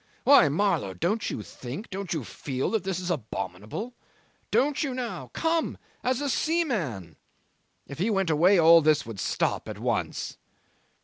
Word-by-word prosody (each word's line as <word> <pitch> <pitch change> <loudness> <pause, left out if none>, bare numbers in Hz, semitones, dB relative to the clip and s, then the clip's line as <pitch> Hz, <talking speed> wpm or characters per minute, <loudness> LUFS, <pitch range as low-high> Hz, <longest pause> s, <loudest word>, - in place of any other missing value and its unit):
Why, 275 - +7
Marlow, 155 - 0
don't 195 +5 0
you 105 - -4
think, 130 - -8
don't 195 -1 -5
you 155 -5 -1
feel, 130 +3 -3
that 220 -2 0
this 190 -2 -2
is 180 -1 -3
abominable; 110 - -4 0.6
don't 285 +1 +2
you 270 -4 -1
now 245 -2 -5
come 330 0 0 0.3
as 255 +2 0
a 290 - -1
seaman? 210 - -1 0.7
If 140 - -9
he 200 +6 +1
went 195 -5 +1
away 175 +6 +5
all 165 0 +8
this 150 -1 +3
would 115 -4 -7
stop - - -1
at - - -6
once." - - -2
180 Hz, 160 wpm, -27 LUFS, 140-235 Hz, 0.7 s, all